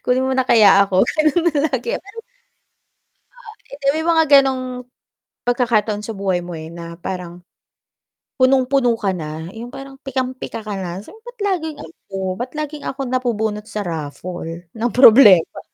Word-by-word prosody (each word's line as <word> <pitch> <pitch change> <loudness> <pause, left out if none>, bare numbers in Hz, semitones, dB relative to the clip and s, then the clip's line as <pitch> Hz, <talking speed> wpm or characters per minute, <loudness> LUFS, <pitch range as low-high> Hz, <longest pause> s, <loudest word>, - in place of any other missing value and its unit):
Kunin 255 +1 +1
mo 265 - 0
na 260 - +2
kaya 205 -4 +6
ako 190 -1 +2
ganun 310 +2 +1 0.2
lagi, 255 -3 -2
pero 405 +4 -9 1.4
ah, - - -33
hindi, 280 0 -5
may 320 - -2
mga 330 -1 +4
ganong 255 -2 0 0.6
pagkakataon 225 -4 +1
sa 225 - -5
buhay 190 -4 -2
mo, 175 - -8
eh, 160 -1 -7
na 170 0 -9
parang 180 -1 -6 1.0
punong-puno 255 -2 +3
ka 200 -4 -1
na, 155 -1 -6
yung 235 +2 -8
parang 275 0 -10
pikam-pika 255 -4 -4
ka 210 - -4
na, 185 -1 -5
sabi 210 - -13
mo, 450 - -19
bat 485 0 -12
laging 355 -7 -2
ako, 165 +4 -12 0.2
ba't 245 +4 -5
laging 300 -1 -5
ako 270 - -5
napubunot 220 -4 -1
sa 210 -2 -4
raffle 165 +2 -6
ng 230 +1 -2
problema. 220 -8 +7
235 Hz, 155 wpm, -19 LUFS, 185-270 Hz, 1.4 s, problema